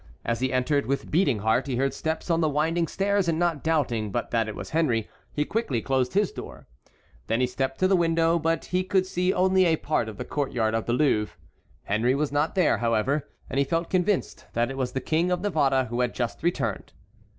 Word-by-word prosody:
As 115 -1 -1
he 130 0 0
entered 135 +3 +1
with 140 +1 -2
beating 155 - +3
heart, 110 +6 +1
he 130 - -1
heard 135 +2 0
steps 160 +2 -3
on 165 0 +2
the 155 - +2
winding 165 +3 +1
stairs, 200 +2 0
and 165 -1 +1
not 170 -4 0
doubting 120 -10 0
but 120 - -3
that 115 -2 +1
it 110 - -5
was - - -7
Henry 130 -9 +1 0.2
he 150 - -1
quickly 205 - -1
closed 130 +1 0
his 205 -1 +2
door. - - -9 0.6
Then 115 +1 +1
he 130 - +3
stepped 135 +2 -2
to 185 - +5
the 195 - +4
window, 165 -1 +2
but 165 0 0
he 180 +1 0
could 185 0 +1
see 180 0 0
only 190 0 +3
a 165 -2 +4
part 150 -7 -1
of 105 - -9
the - - -5
court 145 -2 -2
yard 110 -2 +1
of 115 -1 -1
the 120 - +1
Louvre. 125 -6 +1 0.5
Henry 115 +6 +1
was 145 0 -1
not 145 +5 0
there, 175 - +3
however, 120 +5 0 0.2
and 135 - -2
he - - +4
felt 165 +4 -2
convinced 185 +1 0
that 120 +2 0
it - - -6
was 130 -2 -2
the 130 - -2
King 160 +6 +1
of 180 -1 0
Navarre 140 -9 +2
who 120 +1 -4
had 125 -1 -1
just 120 -2 -3
returned. 140 - -2
145 Hz, 230 wpm, -26 LUFS, 125-170 Hz, 0.6 s, to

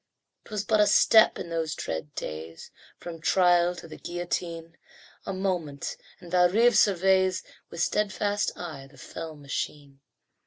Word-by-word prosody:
'Twas 210 -2 -3
but 215 +1 +2
a 210 - +5
step 220 +1 +6
in 170 - -6
those 160 -1 -2
dread 80 -2 -5
days 80 +1 -7 0.3
From 165 -2 -9
trial 175 0 +3
to 170 - -10
the 155 - -11
guillotine; 170 -1 -4 0.5
A - - -1
moment, 180 -7 -3 0.2
and 175 -2 -13
Valrive 195 +7 +4
surveys 190 -2 +3 0.3
With 170 - -2
steadfast 205 0 0
eye 155 -6 -7
the - - -19
fell 160 -1 -8
machine. 140 -1 -6
175 Hz, 140 wpm, -27 LUFS, 160-190 Hz, 0.5 s, step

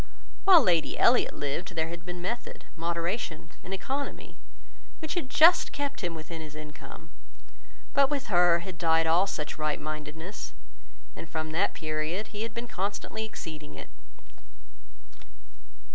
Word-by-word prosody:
While 365 -6 +9
Lady 170 -6 +2
Elliot 245 +1 +4
lived, 170 +7 -3
there 160 0 0
had 170 0 -7
been 180 0 -5
method, 235 +6 -4
moderation, 170 +1 -2
and 185 - -8
economy, 270 +9 -4 0.6
which 315 -3 -4
had 330 -8 -2
just 330 +6 +7
kept 285 -1 -3
him 175 -3 -2
within 160 +1 -7
his 155 -1 -9
income; 155 0 -10 0.8
but 275 -1 +5
with 285 -2 -1
her 175 -3 +5
had 180 -1 -8
died 165 -1 +4
all 170 +4 +4
such 155 -5 -4
right 155 -1 0
mindedness, 155 +5 -6 0.6
and 165 - -8
from 155 -1 -3
that 160 - +1
period 155 +6 -2
he 210 -1 -6
had 230 - -2
been 235 +1 -4
constantly 205 +2 -3
exceeding 155 -8 -8
it. - - -9
175 Hz, 145 wpm, -29 LUFS, 160-220 Hz, 0.8 s, While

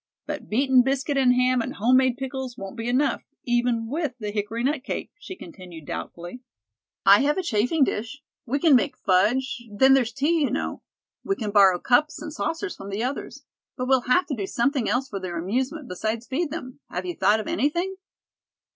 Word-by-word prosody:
But - - -6
beaten 260 +3 +4
biscuit 275 +3 0
and 255 -2 +4
ham 250 0 +3
and - - -5
home 245 +5 +4
made 260 -2 +2
pickles 265 -2 -5
won't 195 +2 -7
be 230 0 -4
enough, 260 +2 +1 0.2
even 240 -2 0
with 290 0 -2
hickory 210 +2 -3
nut 275 0 0
cake," - - -4
she 375 - -8
continued 180 - -11
doubtfully. 175 - -7 0.6
"I 200 +1 +8
have 295 +4 +1
a 375 - -1
chafing 250 +2 +2
dish. 260 +4 -3 0.2
We 265 +5 0
can 295 -1 +5
make 275 +3 +1
fudge; 240 +7 +1
then 265 +6 +5
there's 250 -4 +3
tea, 305 +7 +1
you 280 - +2
know. - - -3 0.4
We 390 - 0
can 215 - -4
borrow 195 -3 +6
cups 295 - +2
and 305 0 -7
saucers 330 +5 -3
from 195 - -9
the 200 +3 -2
others. 265 +3 -5 0.3
But 255 -1 -2
we'll 265 -1 +4
have 360 +9 +4
to 280 - -3
do 200 -4 -4
something 245 +2 0
else 250 +5 0
for 200 -6 -5
their 180 -2 -5
amusement 255 - -2
besides 220 +5 -3
feed 290 +6 -2
them. 275 -4 -7
Have - - -4
you 355 - -3
thought 220 -8 +3
of 215 - -5
anything?" 345 - 0
255 Hz, 195 wpm, -25 LUFS, 220-280 Hz, 0.6 s, I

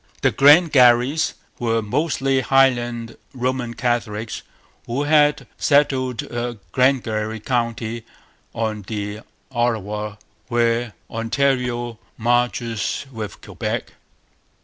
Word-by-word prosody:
The - - +4
Glengarries 140 -2 +5 0.2
were 115 -1 0
mostly 135 +2 0
Highland 120 -4 +2 0.2
Roman 125 -1 -2
Catholics 115 -3 -2 0.5
who 130 +5 -1
had 150 0 +3
settled 130 -4 +2 0.4
Glengarry 110 -4 +1
county 115 -1 -2 0.5
on 110 -2 -2
the 105 -1 -4 0.3
Ottawa, 105 -4 -1 0.3
where 120 -1 +1 0.2
Ontario 120 -1 -1 0.2
marches 120 -1 0
with 110 -4 -7
Quebec. - - -4
120 Hz, 80 wpm, -21 LUFS, 115-130 Hz, 0.5 s, Glengarries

